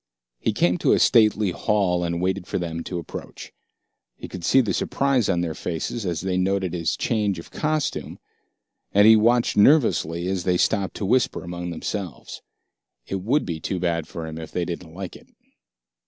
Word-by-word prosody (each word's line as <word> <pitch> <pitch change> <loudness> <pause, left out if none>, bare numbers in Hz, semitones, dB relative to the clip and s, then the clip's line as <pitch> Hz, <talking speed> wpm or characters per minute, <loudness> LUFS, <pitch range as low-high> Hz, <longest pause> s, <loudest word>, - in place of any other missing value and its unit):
He - - 0
came 90 +1 +1
to - - +3
a - - +3
stately 105 -3 +4
halt 95 -3 +1
and 85 0 -2
waited 95 0 -1
for - - -2
them 85 -2 -4
to 90 - -4
approach. 85 - -8 0.6
He - - -9
could 90 -2 -8
see 135 - +4
the 110 -7 +1
surprise 135 -1 +1
on 90 -3 +1
their 85 -2 -2
faces 90 +7 -4
as 85 -3 -2
they 95 0 -1
noted 95 -1 0
his 85 -3 -1
change 105 -4 0
of 85 - -10
costume, 155 -1 -2 0.7
and 100 +1 +5
he 110 0 +9
watched 115 +2 +3
nervously 100 - +4
as 95 -2 -1
they 90 0 +2
stopped 100 0 0
to 100 - -3
whisper 120 +1 +1
among 90 0 -5
themselves. 85 -2 -5 0.6
It 95 -1 -4
would 130 +10 +1
be 85 -3 -4
too 90 +4 -3
bad 85 -3 -1
for 80 0 -6
him 80 0 -7
if 80 - -8
they 90 - -1
didn't 85 -1 -7
like 95 -1 -6
it. - - -15
90 Hz, 185 wpm, -23 LUFS, 85-105 Hz, 0.7 s, he